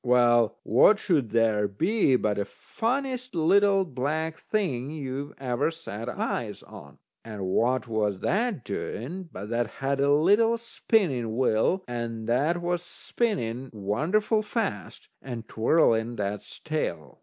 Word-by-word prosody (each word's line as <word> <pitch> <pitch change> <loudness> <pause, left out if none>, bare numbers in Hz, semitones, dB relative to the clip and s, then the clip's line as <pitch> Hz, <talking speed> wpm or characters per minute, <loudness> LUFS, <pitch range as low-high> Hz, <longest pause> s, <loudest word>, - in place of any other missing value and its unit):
Well, 120 -2 +4
what 130 - +5
should 150 - +1
there 110 -2 +2
be 165 - +2
but 105 -4 0
the 100 - 0
funniest 255 - -3
little 195 +4 +4
black 155 +3 -2
thing 155 - -2
you 140 -1 -5
ever 130 +2 0
set 125 -9 -7
eyes 115 -3 -3
on. 95 -9 -13 0.3
And 105 -4 -6
what 125 +7 +1
was 105 -3 0
that 210 - 0
doing, 170 - -5
but 100 +3 -7
that 120 0 0
had 135 +4 -2
a 140 +1 +3
little 205 +10 +4
spinning 165 - 0
wheel, 130 - +2
and 115 -2 -4
that 145 +9 +2
was 175 0 0
spinning 135 - -2
wonderful 160 - +1
fast, 210 - -4
and 120 -4 -7
twirling 115 -2 +2
that's 105 -1 -4
tail. 85 - -4
130 Hz, 130 wpm, -27 LUFS, 115-180 Hz, 0.3 s, what